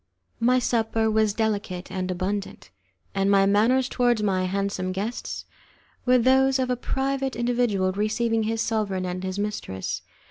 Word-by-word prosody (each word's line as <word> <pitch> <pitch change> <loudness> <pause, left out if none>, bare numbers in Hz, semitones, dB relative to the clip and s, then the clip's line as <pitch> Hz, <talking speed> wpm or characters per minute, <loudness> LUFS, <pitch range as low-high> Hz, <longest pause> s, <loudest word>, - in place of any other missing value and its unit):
My 250 +2 +4
supper 225 -2 +1
was 215 -1 +3
delicate 205 -5 -2
and 185 -1 -3
abundant, 190 +2 -3 0.4
and 195 0 +1
my 195 -1 +5
manners 230 +6 +3
towards 240 -4 +1
my 185 -2 +1
handsome 195 -1 -2
guests 210 +6 -4 0.6
were 255 0 +6
those 265 +2 +4
of 255 -1 0
a - - +2
private 270 +1 -2
individual 235 -6 +1
receiving 220 +3 0
his 225 +1 -1
sovereign 200 -4 -1
and 180 +1 -4
his 185 0 -3
mistress. 205 - -3
215 Hz, 145 wpm, -25 LUFS, 195-245 Hz, 0.6 s, were